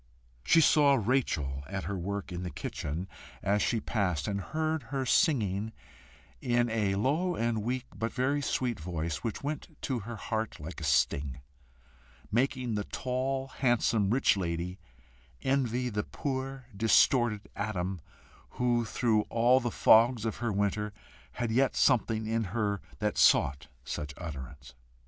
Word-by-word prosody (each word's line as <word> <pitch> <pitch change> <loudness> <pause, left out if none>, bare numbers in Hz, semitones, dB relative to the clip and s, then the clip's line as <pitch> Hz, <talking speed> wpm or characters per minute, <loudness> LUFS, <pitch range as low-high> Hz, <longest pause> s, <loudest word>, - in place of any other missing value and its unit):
She 165 - +5
saw 145 -2 +5
Rachel 100 - 0
at 95 -1 -4
her 100 - -3
work 100 +2 -4
in 90 0 -4
the 90 - -4
kitchen 75 +3 -4 0.4
as 105 +2 +2
she 115 - +1
passed, 90 -9 -1
and 100 -1 -1
heard 155 - -1
her 135 -1 -1
singing 110 - +2 0.7
in 120 -1 +1
a 105 -3 +1
low 155 - +1
and 115 -1 0
weak 125 +3 -2
but 115 +3 -2
very 140 +3 0
sweet 125 -5 -1
voice, 80 -1 -3
which 110 - -5
went 150 +1 -5
to 130 -3 -1
her 115 +3 -7
heart 110 0 -3
like 80 +3 -7
a - - -5
sting, 70 0 +1 0.9
making 125 0 0
the 105 -1 -2
tall, 130 +1 -2
handsome, 120 -6 +2
rich 125 +1 +3
lady 90 0 -3 0.6
envy 125 -2 +1
the 105 -3 -1
poor 135 -1 -4
distorted 110 0 +3
atom 95 -4 -3 0.6
who, 120 -1 +2
through 110 -1 +2
all 120 +3 +4
the 120 -2 -2
fogs 115 +1 +5
of 110 - -2
her 120 -1 -1
winter, 100 +1 -1 0.4
had 120 -2 -2
yet 130 +3 +2
something 115 -4 +2
in 115 0 0
her 100 0 -1 0.2
that - - -1
sought 70 +1 +4 0.2
such 75 +1 -5
utterance. 70 -6 -8
110 Hz, 145 wpm, -30 LUFS, 95-125 Hz, 0.9 s, She